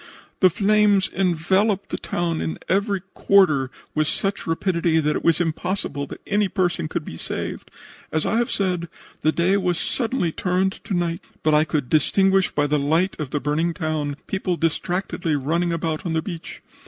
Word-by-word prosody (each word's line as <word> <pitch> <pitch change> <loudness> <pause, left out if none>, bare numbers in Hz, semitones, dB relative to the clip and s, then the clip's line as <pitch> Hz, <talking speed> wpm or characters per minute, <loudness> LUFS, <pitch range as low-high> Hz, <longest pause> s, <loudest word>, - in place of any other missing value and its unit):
The 185 - +6
flames 205 +1 +3
enveloped 190 +3 +1
the - - -1
town 170 -2 -2
in 160 - -3
every 200 0 +1
quarter 155 -10 +4 0.2
with 155 -1 +1
such 195 +4 -2
rapidity 170 -1 +1
that 150 -1 +1
it - - -3
was 165 -1 +3
impossible 165 -3 -2
that - - -9
any 205 0 +2
person 180 -4 0
could 160 0 -4
be 80 - -7
saved. - - -5 0.4
As 155 - 0
I 225 - +1
have 240 0 +1
said, 180 -4 -1 0.3
the 155 - +3
day 180 +5 +2
was 180 -3 0
suddenly 230 -7 -1
turned 185 +3 0
to 195 - -1
night, 170 -1 -1 0.2
but 155 - +3
I 150 +1 +5
could 150 -4 -1
distinguish 190 +6 +3
by 145 - 0
the 150 0 +1
light 160 +7 +1
of 150 -4 -3
the 145 - -1
burning 160 +4 0
town 155 -4 -2
people 185 -2 -2
distractedly 170 0 -1
running 165 +5 0
about 160 -2 -2
on 170 - -2
the 160 -1 0
beach. 170 -4 -7
170 Hz, 180 wpm, -23 LUFS, 155-190 Hz, 0.4 s, The